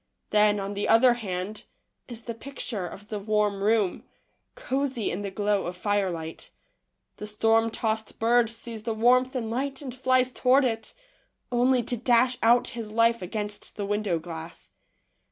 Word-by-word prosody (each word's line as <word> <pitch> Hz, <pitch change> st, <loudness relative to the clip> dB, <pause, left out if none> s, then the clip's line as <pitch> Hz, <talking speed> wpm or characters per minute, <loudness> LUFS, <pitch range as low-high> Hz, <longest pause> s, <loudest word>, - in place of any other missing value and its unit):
Then, 210 Hz, 0 st, +4 dB
on 195 Hz, +1 st, -4 dB
the 205 Hz, 0 st, -2 dB
other 240 Hz, +2 st, +6 dB
hand, 200 Hz, -2 st, -5 dB, 0.4 s
is 235 Hz, -2 st, -7 dB
the 235 Hz, -, -5 dB
pict 270 Hz, +3 st, -7 dB
ure 195 Hz, -6 st, -3 dB
of 205 Hz, +4 st, -11 dB
the 210 Hz, -, -3 dB
warm 210 Hz, -1 st, 0 dB
room, 210 Hz, -3 st, +1 dB, 0.5 s
cosey 275 Hz, -, -2 dB
in 185 Hz, -, -3 dB
the 200 Hz, -, -3 dB
glow 205 Hz, 0 st, 0 dB
of 180 Hz, +1 st, -6 dB
firelight. 180 Hz, -5 st, -2 dB, 0.7 s
The 210 Hz, -, -6 dB
storm 225 Hz, +2 st, +2 dB
tossed 220 Hz, -1 st, -3 dB
bird 235 Hz, 0 st, +3 dB
sees 230 Hz, -1 st, -6 dB
the 225 Hz, +1 st, -3 dB
warmth 255 Hz, +3 st, +3 dB
and 225 Hz, -3 st, -2 dB
light 270 Hz, +3 st, -2 dB
and 260 Hz, -3 st, -6 dB
flies 255 Hz, 0 st, +2 dB
toward 260 Hz, +2 st, +3 dB
it, 225 Hz, -2 st, -3 dB, 0.6 s
only 245 Hz, +1 st, +3 dB
to 245 Hz, +1 st, -1 dB
dash 245 Hz, +2 st, +3 dB
out 240 Hz, +2 st, +4 dB
his 230 Hz, -3 st, -6 dB
life 230 Hz, 0 st, +3 dB
against 205 Hz, +3 st, -4 dB
the 205 Hz, -, -3 dB
window 205 Hz, -3 st, 0 dB
glass. 165 Hz, 0 st, -9 dB
225 Hz, 165 wpm, -26 LUFS, 205-245 Hz, 0.7 s, other